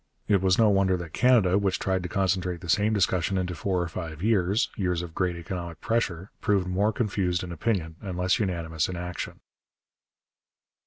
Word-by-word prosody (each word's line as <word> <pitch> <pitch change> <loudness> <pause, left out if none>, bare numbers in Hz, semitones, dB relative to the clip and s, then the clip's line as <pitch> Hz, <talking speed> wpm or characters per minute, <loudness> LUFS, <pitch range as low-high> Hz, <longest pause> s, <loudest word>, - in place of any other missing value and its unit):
It 100 -3 +3
was 95 -1 +3
no 115 - +5
wonder 95 -2 +3
that 85 -3 -8
Canada, 110 -7 +4
which 95 -2 +1
tried 95 -1 0
to 90 - -5
concentrate 90 -2 0
the 85 - -8
same 105 +5 +3
discussion 95 -2 +1
into 90 -1 -1
four 90 +1 -1
or - - -3
five 80 -1 -6
years, 105 +1 +2
years 90 -5 -1
of 85 -2 -8
great 90 -1 0
economic 85 -1 -6
pressure, 100 -5 -1
proved 100 -3 +2
more 95 +4 +1
confused 95 -6 -1
in 90 - -6
opinion 85 -2 -2
and 95 -4 -5
less 90 +1 +2
unanimous 85 -6 -1
in 90 - -4
action. 90 0 -5
90 Hz, 180 wpm, -27 LUFS, 85-100 Hz, -, no